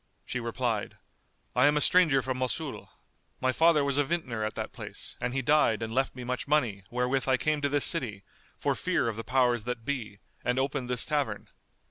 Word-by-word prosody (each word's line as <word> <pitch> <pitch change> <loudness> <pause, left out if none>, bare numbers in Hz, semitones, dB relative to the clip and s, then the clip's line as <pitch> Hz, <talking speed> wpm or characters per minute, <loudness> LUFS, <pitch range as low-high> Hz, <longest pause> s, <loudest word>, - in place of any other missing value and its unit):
She 125 - -3
replied, 115 -2 -2 0.6
"I 125 +3 +5
am 150 0 +3
a - - +4
stranger 150 -4 +4
from 130 -1 -2
Mosul. 130 +3 -3 0.5
My 130 - +2
father 160 +1 +4
was 140 0 +2
a - - +5
vintner 135 -8 -2
at 110 - -3
that - - -4
place - - -7
and 125 0 -1
he 135 +1 -1
died 120 -5 +3
and 110 0 -4
left 135 +1 0
me 125 - -7
much 125 +2 -3
money 125 -10 +1
wherewith 125 +2 0
I 130 -1 +4
came 155 +2 0
to 140 - +1
this 145 0 +2
city, 115 - -1 0.3
for - - +1
fear - - 0
of 115 - -2
the 115 - -5
powers 125 -3 +2
that 120 -2 -4
be, 120 -8 -3 0.3
and 125 +1 0
opened 135 -1 -1
this 125 -3 0
tavern. 140 -9 -2
130 Hz, 205 wpm, -29 LUFS, 120-145 Hz, 0.6 s, I